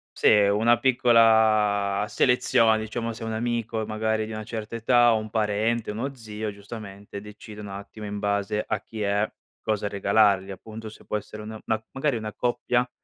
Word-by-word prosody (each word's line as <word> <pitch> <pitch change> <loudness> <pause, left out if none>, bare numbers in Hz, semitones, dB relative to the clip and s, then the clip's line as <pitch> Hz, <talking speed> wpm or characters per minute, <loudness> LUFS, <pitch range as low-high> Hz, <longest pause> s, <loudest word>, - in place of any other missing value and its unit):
Sì - - +2
è 105 -1 +5
una 115 +4 +3
piccola 110 -5 +4
selezione, 115 -3 +3
diciamo, 115 +1 -3
se 115 - -12
è - - -3
un 110 - -3
amico 115 -1 -2
e - - -3
magari 110 0 -1
di 110 - -8
una 110 0 -5
certa 110 0 -6
età, 120 +1 +4
o - - +2
un 110 0 -7
parente, 110 +1 0
uno 130 +6 -3
zio 110 -2 -5
giustamente 100 -1 -9
decide 105 0 -11
un 105 - -7
attimo 100 +2 -8
in 105 0 -4
base 100 +1 -1
a 105 -2 -1
chi 110 -1 -8
è, 100 +1 +1 0.3
cosa 105 -1 -1
regalargli 100 -1 +3
appunto, 110 +3 -8
se 105 - -15
può 105 - -1
essere 105 +1 -8
una 110 0 -8
ma 110 0 -1
magari 135 -2 0
una 110 -1 -5
coppia 125 0 0
110 Hz, 190 wpm, -25 LUFS, 105-115 Hz, 0.3 s, è